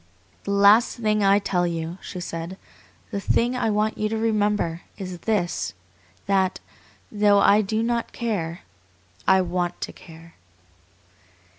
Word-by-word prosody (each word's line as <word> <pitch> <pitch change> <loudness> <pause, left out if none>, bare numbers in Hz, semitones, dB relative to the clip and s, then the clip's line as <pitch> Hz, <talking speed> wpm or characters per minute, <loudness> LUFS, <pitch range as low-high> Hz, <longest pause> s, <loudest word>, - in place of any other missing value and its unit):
"The - - -2
last 200 +3 +5
thing 215 -2 +1
I 195 0 +5
tell 180 -3 0
you," 165 +1 -4
she 180 - -7
said, 170 +1 -6 0.5
"the 200 - -2
thing 240 +5 +1
I 250 -3 0
want 215 +1 0
you 215 - 0
to 225 - -2
remember, 210 -6 0 0.2
is 185 -3 -6
this, 175 - -1 0.5
that, 190 -2 +1 0.5
though 205 -1 +4
I 200 +1 +5
do 215 +2 -1
not 235 0 -1
care 180 -8 -3 0.7
I 190 0 +5
WANT 175 -1 -2
to - - -4
care." 165 0 -15
200 Hz, 140 wpm, -24 LUFS, 175-215 Hz, 0.7 s, last